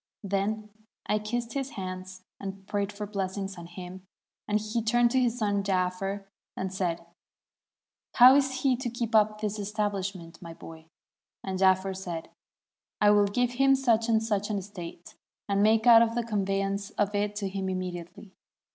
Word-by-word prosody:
Then 205 +2 -1 0.4
I 210 - +1
kissed 230 +2 -3
his 275 0 -3
hands, 185 0 -6 0.2
and 195 0 -7
prayed 200 0 -2
for 210 0 -5
bless 195 -2 -3
ings 195 -1 -4
on 170 -1 -9
him, 180 +1 -10 0.4
and 210 0 +2
he 215 +2 -2
turned 235 +1 +3
to 260 - +3
his 245 -1 +1
son 205 -3 +1
Jaafer 195 +1 -1 0.3
and 190 0 -3
said, 170 -3 -2 1.1
'How 250 +1 +9
is 270 -2 +1
he 265 -2 +4
to 250 -1 -3
keep 235 0 -4
up 215 -1 +4
this 210 0 -2
estabhshment, 200 -4 -3
my 165 -2 -9
boy?' 160 -1 -12 0.6
and 190 -1 -3
Jaafer 190 0 +3
said, 175 -4 -6 0.3
' - - -66
I 205 0 +6
will 205 -1 +5
give 245 +4 0
him 270 +2 +4
such 235 -4 +2
and 220 -1 +3
such 205 -2 -1
an 210 - -1
estate, 180 -3 -8 0.3
and 200 0 +1
make 220 +2 +4
out 230 -1 +7
the 240 - 0
conveyance 195 -2 -1
of 205 0 +1
it 205 0 -1
to 205 -1 -2
him 190 0 -3
immediately.' 185 +2 -6
200 Hz, 175 wpm, -28 LUFS, 190-220 Hz, 1.1 s, How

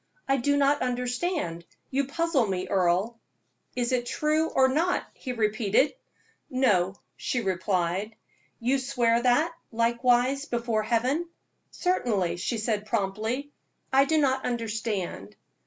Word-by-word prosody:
I 270 - +3
do 285 +3 +1
not 285 +1 +3
understand 250 - -2 0.3
you 275 +1 +1
puzzle 290 -4 +1
me, 185 -1 -2
Earle." 190 +5 +1 0.6
"Is 245 -1 0
it 245 -1 0
true, 305 +4 +1
or 265 0 +4
not?" 320 +7 +1
he 255 - -6
repeated. 215 +2 +2 0.6
"No," 200 -8 +2 0.2
she 250 - -1
replied. 190 0 -1 0.4
"You 255 +4 +1
swear 240 -3 +1
that, 255 +7 +3 0.2
likewise, 245 +4 +2
before 235 -4 -1
Heaven?" 255 +10 0 0.4
"Certainly," 210 - 0
she 230 +6 -2
said, 215 -1 -1
promptly. 220 +6 -2 0.4
"I 270 +1 +6
do 315 +2 +2
not 265 -3 +2
understand." 220 - -3
240 Hz, 125 wpm, -27 LUFS, 215-275 Hz, 0.6 s, I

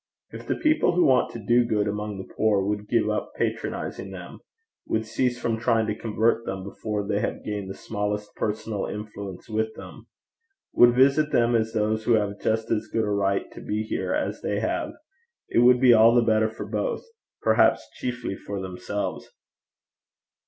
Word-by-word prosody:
If - - -9
the - - 0
people 310 - +2
who 180 - +4
want 130 -2 +4
to - - -5
do 120 +2 +4
good 105 -3 0
among 105 0 -3
the 95 - -9
poor 105 -3 +2
would 105 +1 -2
give 115 -2 +2
up 105 0 -2
patronizing - - -3
them, - - -9 0.5
would 110 0 0
cease 120 +2 -1
from 115 -2 -1
trying 115 -1 +2
to 105 - -1
convert 115 +1 0
them 95 -3 -5
before 105 +1 -4
they 100 -1 0
have - - -3
gained 105 -2 -4
the 95 - -6
smallest 105 -1 -4
personal 110 -1 -2
influence 100 -3 -7
with 110 0 -2
them, - - -11 0.7
would 120 0 +6
visit 140 +4 +4
them 120 0 +3
as 110 0 0
those 110 0 0
who 120 - +4
have 105 -2 0
just 110 0 0
as 110 0 0
good 110 +1 -1
a 105 - -1
right 100 -1 +1
to - - -10
be 105 +1 -2
here 110 - -3
as 295 +1 -2
they - - -1
have, - - -2 0.6
it - - +2
would 125 +1 +6
be 125 -1 +7
all 115 +1 +6
the 120 - +5
better 110 -1 +2
for 110 - -7
both, 105 0 -2 0.4
perhaps - - +3
chiefly 120 -5 -4
for 100 0 -6
themselves. 95 +2 -4
110 Hz, 185 wpm, -25 LUFS, 105-115 Hz, 0.7 s, be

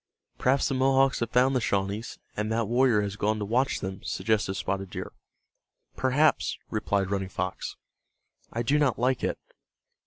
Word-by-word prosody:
"Perhaps 135 +2 +3
the 135 - -1
Mohawks 135 +1 +3
have 115 - -1
found 125 +3 +3
the 125 - +2
Shawnees, 100 +2 -1 0.2
and 105 +1 -2
that 115 -1 0
warrior 120 -2 +3
has 100 -1 -3
gone 110 +2 +1
to 105 - -3
watch 125 +6 +1
them," 95 0 -5
suggested 105 -3 0
Spotted 95 0 -2
Deer. - - -6 0.8
"Perhaps," 135 +4 +2
replied 100 -3 0
Running 95 -1 -1
Fox. 95 -1 -4 0.8
"I 120 - -2
do 145 +6 +2
not 140 -5 +2
like 125 +1 +1
it. - - 0
115 Hz, 160 wpm, -27 LUFS, 100-130 Hz, 0.8 s, Perhaps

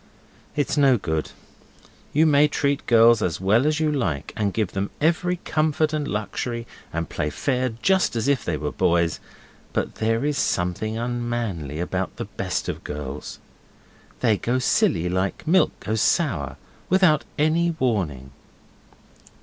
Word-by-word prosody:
It's 145 +1 0
no 135 -3 +5
good. 80 -6 -2 0.8
You 155 +3 +4
may 150 -1 +5
treat 140 -1 -1
girls 115 -1 +6
as 85 -5 -1
well 110 +9 +3
as 155 0 +1
you 155 -1 +2
like, 85 - -2
and 105 -2 0
give 105 -2 -1
them 100 0 -2
every 170 +3 +2
comfort 155 0 +1
and 150 -2 -1
luxury, 115 +3 -3 0.3
and 85 0 -3
play 75 - -2
fair 130 - -1
just 190 -8 +3
as 115 +3 -1
if 140 -2 +2
they 80 - -1
were 75 -1 -3
boys, 85 -2 +1 0.5
but - - -1
there 115 +4 +1
is 150 -2 0
something 90 +5 -1
unmanly 120 - -3
about 90 - -2
the - - -5
best - - -3
of - - -4
girls. 75 -1 -6 0.8
They 110 -4 +3
go 120 +5 0
silly, 90 -8 +2
like 95 +6 -2
milk 170 +1 +3
goes 110 +2 -1
sour, 85 - +1 0.3
without 180 -5 +4
any 160 +3 +2
warning. 80 - -1
115 Hz, 150 wpm, -23 LUFS, 90-145 Hz, 0.8 s, girls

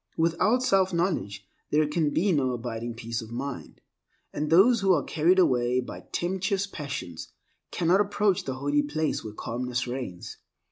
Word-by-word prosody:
Without 175 +9 +2
self 190 -5 +3
knowledge 170 - -1 0.2
there 150 0 +2
can 150 0 +1
be 185 +7 +1
no 135 -6 +1
abiding 120 -1 -5
peace 115 0 -4
of 110 - -10
mind, 130 +2 -6 0.5
and 150 0 -2
those 200 +7 +5
who 195 -1 +3
are - - 0
carried 170 +4 +2
away 125 -7 +3
by 125 - -7
tempestuous 190 +2 -1
passions 140 - -6 0.4
cannot 180 +3 +2
approach 205 -1 +1
the 130 - -3
holy 145 +2 +1
place 150 +2 -2
where 110 - -6
calmness 125 +2 -3
reigns. 120 -8 -6
150 Hz, 155 wpm, -27 LUFS, 125-185 Hz, 0.5 s, those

